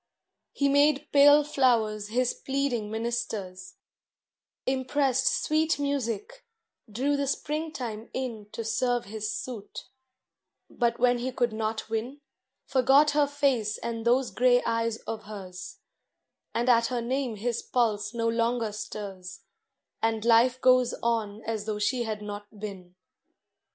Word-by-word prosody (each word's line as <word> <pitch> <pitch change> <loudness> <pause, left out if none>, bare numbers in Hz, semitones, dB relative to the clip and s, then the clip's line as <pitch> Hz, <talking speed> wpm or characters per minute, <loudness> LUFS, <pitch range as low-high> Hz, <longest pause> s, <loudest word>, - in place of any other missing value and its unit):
He 280 - +1
made 285 +1 +3
pale 290 +1 +7
flowers 230 -7 +1
his 245 +3 +1
pleading 265 -6 -2
ministers, 220 -5 -4 0.9
Impressed 265 0 +1 0.2
sweet 315 +1 +2
music, 285 - -3 0.5
drew 270 +7 0
the 280 -1 -1
springtime 270 -7 -3
in 230 -5 -5
To 230 - -5
serve 240 +2 0
his 215 +1 -4
suit; 220 -3 -6 0.9
but 235 -1 0
when 245 0 +3
he 255 +2 -2
could 240 -2 0
not 220 0 -3
win, 225 +6 -3 0.5
Forgot 270 +3 +4
her 290 0 +3
face 270 -7 0
and 230 -1 -4
those 245 +2 +2
gray 245 0 +3
eyes 230 -1 0
of 220 -1 -5
hers; 185 -3 -8 0.8
And 240 +2 0
at 235 -2 +5
her 245 -2 -2
name 255 -1 -1
his 235 +3 -2
pulse 210 -4 0
no 230 -1 -1
longer 230 -1 0
stirs, 195 -3 -7 0.6
And 225 -1 0
life 240 +2 +5
goes 255 -1 +4
on 220 -2 -1
as 220 -2 -3
though 215 -1 -2
she 240 +4 0
had 215 -1 -4
not 205 0 -8
been. 190 -4 -8
235 Hz, 130 wpm, -27 LUFS, 215-260 Hz, 0.9 s, pale